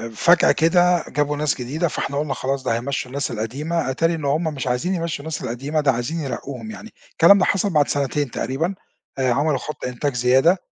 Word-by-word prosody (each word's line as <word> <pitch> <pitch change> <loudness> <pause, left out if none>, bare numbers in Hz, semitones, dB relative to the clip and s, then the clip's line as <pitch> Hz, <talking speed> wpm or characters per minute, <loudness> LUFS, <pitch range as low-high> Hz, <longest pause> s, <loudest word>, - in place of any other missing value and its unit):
فجأة 175 +8 +5
كده 175 +1 +3
جابوا 145 0 -1
ناس 150 -2 0
جديدة، 155 +8 -1
فاحنا 140 -1 -3
قلنا 145 -2 -1
خلاص 135 0 -2
ده 115 - 0
هيمشوا 125 +1 -3
الناس 140 0 -2
القديمة، 135 +7 -2
اتاري 165 +5 +1
إن 155 -3 -5
هُم 150 +5 +1
مش 145 -5 -3
عايزين 125 +10 0
يمشّوا 165 -3 -3
الناس 160 +2 -5
القديمة 140 +6 -2
ده 145 -2 +3
عايزين 130 +7 -3
يرقوهم 140 - -5
يعني، 220 +1 -11 0.2
الكلام 200 +5 +6
ده 185 - +3
حصل 200 +1 +1
بعد 150 -4 +3
سنتين 140 -1 -1
تقريبًا 160 +10 -2 0.4
آآ، 130 -2 +1
عملوا 145 +1 +1
خط 150 +2 -6
إنتاج 125 +3 -2
زيادة 130 +9 +4
145 Hz, 195 wpm, -21 LUFS, 130-165 Hz, 0.4 s, الكلام